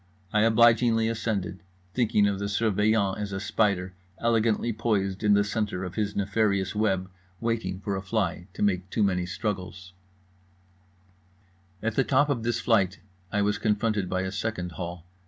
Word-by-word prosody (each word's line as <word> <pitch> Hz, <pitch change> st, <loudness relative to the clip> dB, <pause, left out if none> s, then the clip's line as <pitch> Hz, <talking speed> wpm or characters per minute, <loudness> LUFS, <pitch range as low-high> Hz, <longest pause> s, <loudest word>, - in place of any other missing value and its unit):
I 105 Hz, -, +4 dB
obligingly 115 Hz, 0 st, +4 dB
ascended; 110 Hz, -5 st, -2 dB, 0.3 s
thinking 110 Hz, -4 st, +3 dB
of 100 Hz, -1 st, -1 dB
the 100 Hz, 0 st, -2 dB
Surveillant 105 Hz, -1 st, +1 dB
as 105 Hz, -1 st, -3 dB
a 95 Hz, -, -3 dB
spider, 100 Hz, -2 st, 0 dB, 0.2 s
elegantly 115 Hz, 0 st, +1 dB
poised 105 Hz, -3 st, -1 dB
in 105 Hz, -1 st, +5 dB
the 100 Hz, -, +4 dB
centre 105 Hz, -3 st, -2 dB
of 90 Hz, -, -5 dB
his 105 Hz, -2 st, -2 dB
nefarious 100 Hz, -1 st, +1 dB
web, 95 Hz, -4 st, 0 dB, 0.3 s
waiting 115 Hz, -5 st, -2 dB
for 100 Hz, 0 st, -3 dB
a 95 Hz, -, -3 dB
fly 95 Hz, -3 st, -2 dB
to -, -, -3 dB
make 95 Hz, -2 st, 0 dB
too 110 Hz, -, +1 dB
many 90 Hz, -3 st, +1 dB
struggles…. 95 Hz, -2 st, -4 dB, 1.9 s
At 115 Hz, 0 st, 0 dB
the 135 Hz, -, +2 dB
top 145 Hz, +3 st, +3 dB
of 135 Hz, -5 st, 0 dB
this 120 Hz, +1 st, -1 dB
flight 100 Hz, -5 st, +2 dB, 0.3 s
I 105 Hz, 0 st, +1 dB
was 105 Hz, +1 st, 0 dB
confronted 105 Hz, -3 st, 0 dB
by 95 Hz, 0 st, 0 dB
a 95 Hz, -, -3 dB
second 100 Hz, -3 st, -3 dB
hall. 85 Hz, +1 st, -6 dB
105 Hz, 160 wpm, -27 LUFS, 95-110 Hz, 1.9 s, in